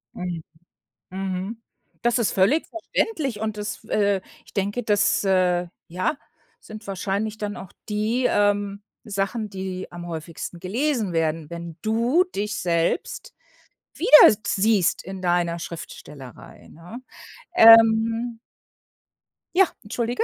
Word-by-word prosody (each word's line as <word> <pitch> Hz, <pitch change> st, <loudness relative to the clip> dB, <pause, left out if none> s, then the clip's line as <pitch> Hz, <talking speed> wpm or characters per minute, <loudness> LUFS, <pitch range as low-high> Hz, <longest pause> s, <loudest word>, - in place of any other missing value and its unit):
Mhm, 175 Hz, -3 st, -5 dB, 0.7 s
mhm. 190 Hz, +4 st, -4 dB, 0.4 s
Das 240 Hz, 0 st, +2 dB
ist 225 Hz, -, +1 dB
völlig 225 Hz, +12 st, +2 dB
verständlich 315 Hz, -, -2 dB
und 215 Hz, -1 st, -3 dB
es 210 Hz, +1 st, -5 dB
äh, 200 Hz, -3 st, +1 dB, 0.2 s
ich -, -, -19 dB
denke, 205 Hz, +4 st, -2 dB
das, 205 Hz, -1 st, +2 dB
äh, 180 Hz, -2 st, +2 dB, 0.2 s
ja, 185 Hz, -, -1 dB, 0.4 s
sind 215 Hz, -1 st, -11 dB
wahrscheinlich 200 Hz, +3 st, -3 dB
dann 205 Hz, -1 st, -4 dB
auch 190 Hz, -, -10 dB, 0.2 s
die, 220 Hz, +4 st, 0 dB
ähm, 205 Hz, 0 st, +1 dB, 0.2 s
Sachen, 205 Hz, +2 st, -2 dB
die 190 Hz, -1 st, -5 dB
am 175 Hz, 0 st, -8 dB
häufigsten 165 Hz, +1 st, -7 dB
gelesen 225 Hz, -, -1 dB
werden, 160 Hz, -1 st, -1 dB
wenn 170 Hz, -1 st, -7 dB
du 235 Hz, +11 st, +2 dB
dich 205 Hz, +1 st, -2 dB
selbst 170 Hz, -, -1 dB, 0.6 s
wiedersiehst 210 Hz, -, +5 dB
in 190 Hz, 0 st, -7 dB
deiner 175 Hz, -1 st, +1 dB
Schriftstellerei, 150 Hz, -6 st, -10 dB
ne? 175 Hz, +9 st, -11 dB, 0.6 s
Ähm 225 Hz, -1 st, +6 dB, 1.2 s
Ja, 385 Hz, -1 st, +6 dB, 0.2 s
entschuldige, 235 Hz, +3 st, -2 dB
205 Hz, 115 wpm, -23 LUFS, 180-225 Hz, 1.2 s, Ähm